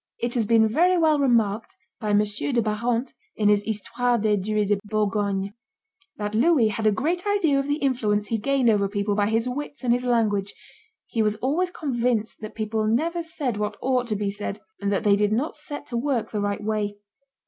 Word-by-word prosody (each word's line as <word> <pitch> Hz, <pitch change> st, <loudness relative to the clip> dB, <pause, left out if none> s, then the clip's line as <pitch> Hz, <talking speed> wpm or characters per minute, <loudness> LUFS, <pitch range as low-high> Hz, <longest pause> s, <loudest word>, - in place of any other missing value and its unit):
It 240 Hz, 0 st, -2 dB
has 230 Hz, -4 st, 0 dB
been 225 Hz, -1 st, +5 dB
very 355 Hz, +11 st, +3 dB
well 315 Hz, -3 st, +3 dB
remarked 225 Hz, -5 st, +1 dB, 0.2 s
by 215 Hz, -, -3 dB
M. 205 Hz, 0 st, +4 dB
de 230 Hz, +5 st, -1 dB
Barante, 235 Hz, +4 st, -1 dB, 0.2 s
in 210 Hz, -1 st, +2 dB
his 205 Hz, -1 st, +4 dB
Histoire 225 Hz, +3 st, -1 dB
des 215 Hz, -1 st, +2 dB
Dues 205 Hz, +1 st, -1 dB
de 205 Hz, -1 st, +2 dB
Bourgogne, 205 Hz, -2 st, -1 dB, 0.6 s
that 210 Hz, 0 st, -3 dB
"Louis 245 Hz, 0 st, +4 dB
had 215 Hz, +1 st, -1 dB
a -, -, +5 dB
great 335 Hz, -, -1 dB
idea 335 Hz, -9 st, +2 dB
of 275 Hz, -, -2 dB
the 290 Hz, -, +1 dB
influence 220 Hz, -8 st, 0 dB
he 225 Hz, -, 0 dB
gained 275 Hz, +2 st, +1 dB
over 205 Hz, -3 st, +3 dB
people 205 Hz, 0 st, -1 dB
by 205 Hz, 0 st, +1 dB
his 225 Hz, +2 st, +1 dB
wits 285 Hz, +2 st, -5 dB
and 240 Hz, -1 st, +3 dB
his 245 Hz, +1 st, 0 dB
language; 215 Hz, -5 st, +1 dB, 0.5 s
he 225 Hz, -, -1 dB
was 210 Hz, -1 st, +1 dB
always 295 Hz, +11 st, 0 dB
convinced 240 Hz, -10 st, -1 dB
that 215 Hz, -, -8 dB
people 215 Hz, 0 st, -1 dB
never 325 Hz, +10 st, +1 dB
said 290 Hz, -8 st, -3 dB
what 210 Hz, 0 st, -2 dB
ought 255 Hz, -1 st, 0 dB
to 215 Hz, -, -1 dB
be 200 Hz, -1 st, -1 dB
said, 205 Hz, 0 st, -4 dB, 0.2 s
and 200 Hz, 0 st, -1 dB
that 195 Hz, -, 0 dB
they 205 Hz, -1 st, +5 dB
did 205 Hz, 0 st, +1 dB
not 255 Hz, +9 st, -1 dB
set 295 Hz, -5 st, -6 dB
to 240 Hz, -, -6 dB
work 250 Hz, -2 st, -1 dB
the 210 Hz, -, -2 dB
right 205 Hz, 0 st, -2 dB
way." 210 Hz, -1 st, -2 dB
220 Hz, 205 wpm, -24 LUFS, 210-260 Hz, 0.6 s, been